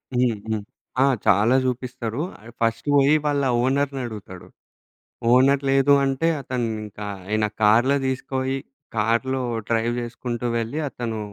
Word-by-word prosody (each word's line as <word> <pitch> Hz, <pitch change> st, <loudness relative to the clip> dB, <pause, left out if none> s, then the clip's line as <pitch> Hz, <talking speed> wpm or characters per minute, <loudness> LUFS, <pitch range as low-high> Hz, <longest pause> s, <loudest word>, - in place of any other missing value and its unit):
హ్మ్. 125 Hz, -3 st, +2 dB
హ్మ్. 110 Hz, -2 st, -2 dB, 0.4 s
ఆ! -, -, +6 dB, 0.2 s
చాలా 105 Hz, +6 st, +4 dB
జూపిస్తరు. 125 Hz, 0 st, -3 dB, 0.2 s
ఆడు 115 Hz, +2 st, -14 dB
ఫస్ట్ 115 Hz, +3 st, 0 dB
పోయి 140 Hz, +1 st, +5 dB
వాళ్ళ 145 Hz, -1 st, +1 dB, 0.2 s
ఓనర్‌ని 135 Hz, +1 st, 0 dB
అడుగుతడు. 100 Hz, -5 st, -9 dB, 0.8 s
ఓనర్ 135 Hz, +2 st, +5 dB
లేదు 135 Hz, +1 st, +4 dB
అంటే 135 Hz, +4 st, +1 dB
అతనింకా, 110 Hz, -5 st, -4 dB, 0.2 s
ఆయన 110 Hz, +1 st, +1 dB, 0.2 s
కార్లో 115 Hz, +6 st, +5 dB
దీసుకపోయి 130 Hz, 0 st, -2 dB, 0.4 s
కార్లో 115 Hz, +5 st, +1 dB, 0.3 s
డ్రైవ్ 115 Hz, +1 st, +1 dB
జేసుకుంటూ 120 Hz, 0 st, -4 dB
వెళ్ళి 115 Hz, +7 st, -2 dB
అతనూ 115 Hz, -4 st, -4 dB
120 Hz, 120 wpm, -23 LUFS, 110-135 Hz, 0.8 s, ఆ